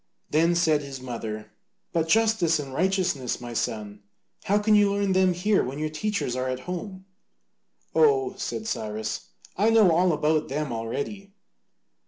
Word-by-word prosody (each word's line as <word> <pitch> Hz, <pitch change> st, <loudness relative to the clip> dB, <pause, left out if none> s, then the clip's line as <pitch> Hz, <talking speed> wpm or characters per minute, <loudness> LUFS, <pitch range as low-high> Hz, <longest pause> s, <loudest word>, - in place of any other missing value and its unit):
Then 165 Hz, +3 st, +3 dB
said 160 Hz, -3 st, +3 dB
his 140 Hz, -2 st, -7 dB
mother, 115 Hz, -4 st, -6 dB, 0.4 s
"But 165 Hz, -1 st, +1 dB
justice 215 Hz, -5 st, +3 dB
and 140 Hz, -3 st, -6 dB
righteousness, 180 Hz, -6 st, 0 dB
my 120 Hz, -1 st, -7 dB
son, 105 Hz, -2 st, -3 dB, 0.4 s
how 205 Hz, -, +3 dB
can 210 Hz, +1 st, +2 dB
you 205 Hz, -1 st, +5 dB
learn 200 Hz, -1 st, 0 dB
them 185 Hz, -1 st, +3 dB
here 200 Hz, +4 st, +2 dB
when 130 Hz, +3 st, -5 dB
your 155 Hz, 0 st, -2 dB
teachers 180 Hz, -6 st, -2 dB
are 130 Hz, 0 st, -2 dB
at 130 Hz, 0 st, -3 dB
home?" 185 Hz, +4 st, -6 dB, 0.9 s
"Oh," 410 Hz, -4 st, +3 dB
said 220 Hz, -, -4 dB
Cyrus, 110 Hz, -, -4 dB, 0.3 s
"I 210 Hz, +4 st, +3 dB
know 220 Hz, -5 st, +5 dB
all 175 Hz, +2 st, +3 dB
about 155 Hz, 0 st, +1 dB
them 145 Hz, -2 st, -3 dB
already." 195 Hz, -, -5 dB
165 Hz, 155 wpm, -26 LUFS, 130-200 Hz, 0.9 s, you